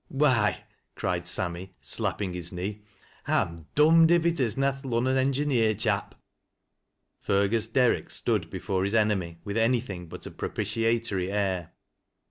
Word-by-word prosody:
" -, -, -43 dB, 0.2 s
Why! 115 Hz, -8 st, +2 dB, 0.2 s
" -, -, -49 dB
cried 85 Hz, -1 st, -2 dB
Sammy, 90 Hz, +1 st, -2 dB
slapping 95 Hz, -3 st, -2 dB
his 85 Hz, -1 st, -3 dB
knee, 100 Hz, +4 st, -5 dB, 0.2 s
" -, -, -26 dB
I'm 85 Hz, -2 st, -1 dB
dom'd 160 Hz, +2 st, +6 dB
if 170 Hz, -1 st, +4 dB
it 170 Hz, -2 st, +1 dB
is 120 Hz, -4 st, +1 dB
na 135 Hz, 0 st, +2 dB
th' 135 Hz, +1 st, -11 dB
Lunnon 130 Hz, 0 st, 0 dB
engineer 130 Hz, -4 st, +2 dB
chap." -, -, -1 dB, 1.0 s
Fergus 100 Hz, +3 st, +1 dB
Derrick 125 Hz, +1 st, +2 dB
stood -, -, 0 dB
before 95 Hz, -1 st, -2 dB
his 100 Hz, +3 st, 0 dB
enemy 100 Hz, -6 st, +1 dB
with 100 Hz, +2 st, -4 dB
anything 115 Hz, -7 st, 0 dB
but -, -, -9 dB
a -, -, -7 dB
propitiatory 115 Hz, -5 st, -1 dB
air. 95 Hz, -4 st, -1 dB
105 Hz, 150 wpm, -27 LUFS, 95-130 Hz, 1.0 s, dom'd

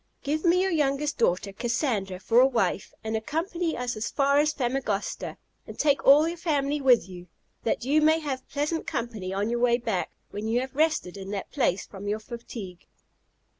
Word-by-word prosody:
Give 305 Hz, +2 st, -1 dB
me 360 Hz, +1 st, +4 dB
your 385 Hz, -, 0 dB
youngest 290 Hz, -2 st, 0 dB
daughter, 195 Hz, -2 st, +1 dB
Cassandra, 225 Hz, -5 st, -1 dB
for 225 Hz, +5 st, +3 dB
a 260 Hz, -, +7 dB
wife, 235 Hz, -6 st, 0 dB
and 220 Hz, 0 st, -2 dB
accompany 330 Hz, -, -2 dB
us 245 Hz, -1 st, -2 dB
as 215 Hz, +2 st, -3 dB
far 280 Hz, 0 st, +3 dB
as 300 Hz, +1 st, +3 dB
Famagosta, 245 Hz, -7 st, -2 dB, 0.3 s
and -, -, -9 dB
take 285 Hz, -2 st, +2 dB
all 295 Hz, +4 st, +7 dB
your 340 Hz, +1 st, -3 dB
family 290 Hz, -3 st, 0 dB
with 250 Hz, -8 st, +5 dB
you, 180 Hz, -1 st, -10 dB, 0.4 s
that 230 Hz, -, 0 dB
you 295 Hz, +4 st, +3 dB
may 315 Hz, +1 st, +5 dB
have 280 Hz, -5 st, -5 dB
pleasant 300 Hz, +3 st, -2 dB
company 225 Hz, -6 st, -3 dB
on 200 Hz, +4 st, -1 dB
your 240 Hz, -, 0 dB
way 240 Hz, -1 st, +4 dB
back, 225 Hz, -6 st, -2 dB, 0.2 s
when 210 Hz, +2 st, -4 dB
you 230 Hz, +2 st, +2 dB
have 265 Hz, +1 st, -6 dB
rested 305 Hz, -, +1 dB
in 195 Hz, 0 st, -7 dB
that 200 Hz, -1 st, -5 dB
place 215 Hz, -, +1 dB
from 200 Hz, 0 st, -9 dB
your 210 Hz, +1 st, 0 dB
fatigue." 215 Hz, -5 st, -9 dB
245 Hz, 190 wpm, -27 LUFS, 210-295 Hz, 0.4 s, a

